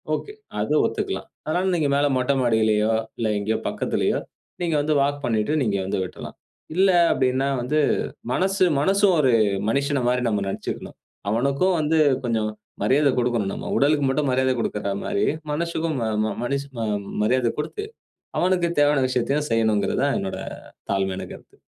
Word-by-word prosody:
Okay, 420 - -7 0.3
அது - - 0
ஒத்துக்கலாம். - - -3 0.2
அதனால 175 +4 0
நீங்க 150 -4 +1
மேல 145 +1 +3
மொட்ட 130 +2 +1
மாடியிலயோ, 110 -2 +2 0.2
இல்ல 115 - -1
எங்கேயோ 110 +2 0
பக்கத்திலேயோ - - 0 0.4
நீங்க 165 -3 0
வந்து 155 +1 +1
வால்க் 145 0 -1
பண்ணிட்டு 110 +5 0
நீங்க 100 -4 0
வந்து 95 - -1
விட்ரலாம். - - -9 0.4
இல்ல 190 +1 +5 0.2
அப்டின்னா, 130 +1 +1
வந்து 150 +5 0 0.5
மனசு 190 +2 +2 0.2
மனசும் 195 +1 +3
ஒரு 130 -3 +3 0.4
மனிஷன 140 0 0
மாரி 125 0 +1
நம்ம 105 -2 0
நெனைத்துக்கணும். 95 - -5 0.3
அவனுக்கும் 140 - +1
வந்து 155 +1 +2 0.3
கொஞ்சம் 110 -2 0 0.3
மரியாத 140 +6 +3
கடுக்கணும் 120 -5 0
நம்ம. - - -6
உடலுக்கு 145 +1 +3
மட்டும் 140 0 0
மரியாத 130 0 +2
குடுக்கிற 105 -3 -2
மாரி - - 0 0.3
மனசக்கும் 165 -1 -1
ம - - 0 0.2
ம - - -1
மனிஷ 140 +3 -1 0.2
ம 110 - -1 0.4
மரியாத 120 +1 +2
குடுத்து, 165 - -4 0.6
அவனுக்கு 180 -1 +2
தேவையான 145 -2 +4
விஷயத்தையும் 135 +4 0
செய்யனுங்குறது 110 0 +1
தான் 140 - +2
என்னோட 95 - -4 0.5
தாழ்மையான 95 -1 -1
கருத்து. - - -15
135 Hz, 150 wpm, -23 LUFS, 110-150 Hz, 0.6 s, இல்ல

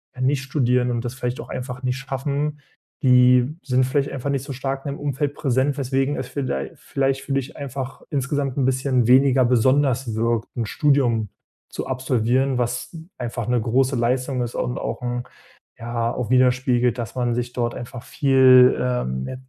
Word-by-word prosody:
ja 130 - -7
nicht 135 +1 +1
studieren 125 -3 +1
und 120 0 -2
das 120 - -3
vielleicht 125 -1 -4
auch - - -7
einfach 125 0 -6
nicht 125 0 -1
schaffen. 140 +2 -3 0.4
Die 125 +1 +5
sind 130 -1 +2
vielleicht 140 +2 0
einfach 135 +1 -4
nicht 135 -2 -1
so 140 - -7
stark 135 +1 -4
in 140 - -2
dem - - -11
Umfeld 145 0 -2
präsent, 135 0 0
weswegen 135 +1 0
es 130 - -4
viellei 130 - -3
vielleicht 135 0 -1
für 140 - -8
dich 135 0 -2
einfach 135 -2 -6
insgesamt 140 -1 -2
'n 135 - +2
bisschen 130 -2 +1
weniger 130 0 +5
besonders 130 0 +2
wirkt, 115 0 0
'n 115 - -1
Studium 120 -4 +1 0.4
zu - - -5
absolvieren, 130 0 0
was 125 +6 -3 0.2
einfach 120 -2 -4
'ne 120 -1 +1
große 130 +4 +1
Leistung 125 +2 0
ist 120 -1 -4
und 125 - -2
auch - - -4
'n, 120 0 -3 0.6
ja, 115 0 -2
auch 125 -4 -4
widerspiegelt, 125 -1 +2
dass 120 +1 -5
man 120 -2 0
sich 120 0 -3
dort 120 -1 -1
einfach 120 0 -8
viel, 130 -2 +5
ähm, 65 - -1
ja, - - -5
130 Hz, 180 wpm, -22 LUFS, 120-135 Hz, 0.6 s, Die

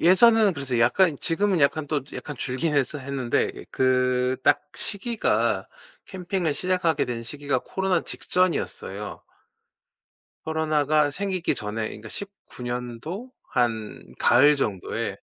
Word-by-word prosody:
예전에는 215 +4 +6
그래서 135 -4 -2
약간 155 +7 +4
지금은 190 +2 +1
약간 145 +1 +2
또 150 -1 0
약간 145 - -6
줄긴 130 +6 -1
했어 145 +1 +1
했는데 130 -3 -1
그 130 0 +2
딱 - - +5 0.2
시기가 225 +2 0 0.4
캠핑을 180 -4 -2
시작하게 180 -2 +1
된 120 -1 -4
시기가 140 +2 -2
코로나 190 +5 -1
직전이었어요. 125 - -2 1.2
코로나가 155 -1 +2
생기기 185 +2 -1
전에 110 0 -4
그러니까 110 +1 -9
19 200 - -9
년도 125 - -5 0.2
한 115 -3 -2
가을 145 +5 +6
정도에 100 -9 -2
145 Hz, 275 characters per minute, -25 LUFS, 125-180 Hz, 1.2 s, 예전에는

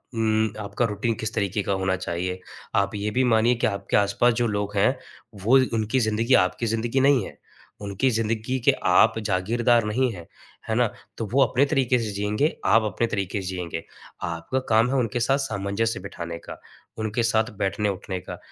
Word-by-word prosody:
उम, 110 -1 +1
आपका 105 +3 -1
रूटीन 105 +2 -1
किस 110 0 -4
तरीके 100 0 -1
का 100 - -2
होना 95 0 0
चाहिए? 90 0 -3 0.4
आप 100 +1 +1
ये 105 +1 -2
भी 130 +4 +2
मानिये 115 0 +3
कि 120 - +1
आपके 100 0 -1
आस-पास 105 +4 +3
जो 120 0 0
लोग 105 -1 -2
हैं, 130 +7 +3 0.5
वो 125 +6 +6 0.2
उनकी 110 +3 +1
ज़िन्दगी 115 +2 +1
आपकी 90 +4 +3
ज़िन्दगी 115 +3 0
नहीं 135 -1 +4
है। - - -11 0.4
उनकी 100 +6 0
ज़िन्दगी 115 +3 -1
के - - +7
आप 110 +5 +4
जागीरदार 115 +4 +2
नहीं 125 +3 +1
है, 85 -4 -10 0.4
है 110 - +1
ना? 120 -1 +3 0.3
तो 115 - -3
वो 135 +1 +6
अपने 135 +2 +2
तरीके 130 -3 +2
से 110 -2 -3
जिएँगे, 105 +9 0
आप 115 0 +5
अपने 110 +2 -1
तरीके 100 -1 -2
से 95 - -6
जिएँगे। 90 -3 -4 0.4
आपका 85 +9 -2
काम 115 +2 +4
है 135 - 0
उनके 120 -2 0
साथ 135 +4 +2
सामंजस्य 110 -4 -2
बिठाने 85 -3 -6
का, - - -10 0.4
उनके 110 +2 -1
साथ 110 -1 +1
बैठने-उठने 100 -2 -2
का। - - -8
110 Hz, 185 wpm, -24 LUFS, 100-120 Hz, 0.5 s, के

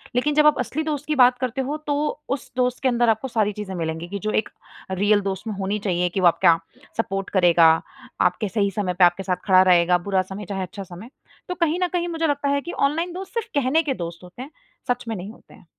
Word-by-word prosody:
लेकिन 290 +4 +1
जब 300 - +5
आप 300 - +3
असली 260 +6 -2
दोस्त 295 -2 -3
की 305 - 0
बात 250 -2 +5
करते 255 0 -2
हो, 280 +3 -3
तो 300 0 -2
उस 270 -2 -4
दोस्त 250 0 0
के 265 - +3
अंदर 240 -1 +2
आपको 220 +4 0
सारी 215 -4 0
चीज़ें 205 -2 -6
मिलेंगी 165 0 -4
कि 200 +1 -4
जो 215 +3 -2
एक - - -15 0.4
रियल 205 +2 +2
दोस्त 195 +2 -4
में 215 - -2
होनी 195 +2 -1
चाहिए 180 -3 0
कि 185 - -3
वो 180 - +5
आपका 165 0 +4 0.4
सपोर्ट 195 -3 -2
करेगा, 175 -3 +5 0.5
आपके 190 +3 +1
सही 200 -2 0
समय 190 -2 -2
पर 180 +1 +2
आपके 175 +2 +1
साथ 185 -1 0
खड़ा 185 -2 +6
रहेगा, 175 0 +4
बुरा 190 +1 0
समय 190 +2 -7
चाहे 195 -1 -3
अच्छा 190 +2 -7
समय। 185 +5 -11 0.4
तो 360 - -3
कहीं 335 -1 0
न - - +2
कहीं 350 -1 0
मुझे 330 -1 -1
लगता 285 -1 0
है 280 0 +1
कि 345 - -6 0.2
ऑनलाइन 335 +4 -3
दोस्त 380 +1 -8
सिर्फ 460 -2 -2
कहने 285 +3 +3
के 285 -3 -1
दोस्त 170 -5 -7
होते 180 +7 -11
हैं, 275 +4 -9 0.4
सच 245 0 -1
में 225 - -2
नहीं 195 +2 -7
होते - - -19
हैं। - - -18
215 Hz, 245 wpm, -23 LUFS, 185-285 Hz, 0.5 s, खड़ा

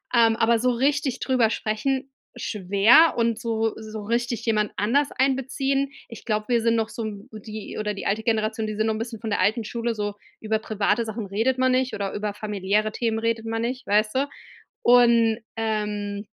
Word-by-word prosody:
Ähm, 230 -1 +5
aber 230 0 +3
so 250 +2 +2
richtig 270 +1 0
drüber 250 -4 +2
sprechen, 260 +6 -2 0.2
schwer, 210 - +4
und 230 -1 +1
so 225 -1 -1
so 220 -1 -7
richtig 235 +1 -1
jemand 215 -2 +1
anders 275 +8 +2
einbeziehen 270 +1 0 0.2
ich 230 - -10
glaube, 215 -2 -1
wir 240 -2 +3
sind 230 0 +2
noch 225 -1 0
so 230 - -5
'n 210 +2 -7
b 215 - -8
die 215 0 -8
oder 210 -1 -1
die 195 - -6
alte 210 +2 0
Generation, 220 -1 0
die 215 - -4
sind 215 +1 0
noch 220 - +1
'n - - -5
bisschen 225 -1 -5
von 220 -2 -4
der - - 0
alten 220 +3 +2
Schule 235 +1 -2
so: 205 -1 -2 0.3
Über 220 0 0
private 215 +1 0
Sachen 220 0 -5
redet 225 +7 0
man 260 0 +3
nicht, 255 0 +1
oder 200 -1 -3
über 210 0 -3
familiäre 210 0 -1
Themen 225 -1 -1
redet 230 0 -1
man 225 0 -2
nicht, 250 +2 -4
weißt 215 +2 +2
du? 275 +2 +1 0.6
Und, 235 -2 +5 0.2
ähm, 210 -2 -2
225 Hz, 200 wpm, -24 LUFS, 215-240 Hz, 0.6 s, Ähm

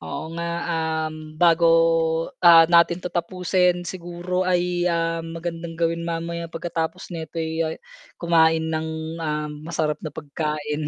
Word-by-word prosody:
Oo 80 - -6
nga, 170 0 -4 0.3
um, 155 -1 -3
bago, 170 0 +4 0.7
ah, 170 -2 +8
natin 170 +1 +4
'to 180 - -4
tapusin, 180 0 +1
siguro 175 +1 -3
ay, 180 0 +1
ah, 165 -1 0
magandang 165 0 -6
gawin 170 0 -1
mamaya 170 0 -3
pagkatapos 165 +2 -4
nito'y, 160 -1 -4
ah, 160 - -4 0.4
kumain 160 -1 +3
ng, 160 0 -4
ah, 150 -1 -2
masarap 150 0 -3
na 155 - -6
pagkain. 150 0 -4
165 Hz, 125 wpm, -23 LUFS, 160-170 Hz, 0.7 s, ah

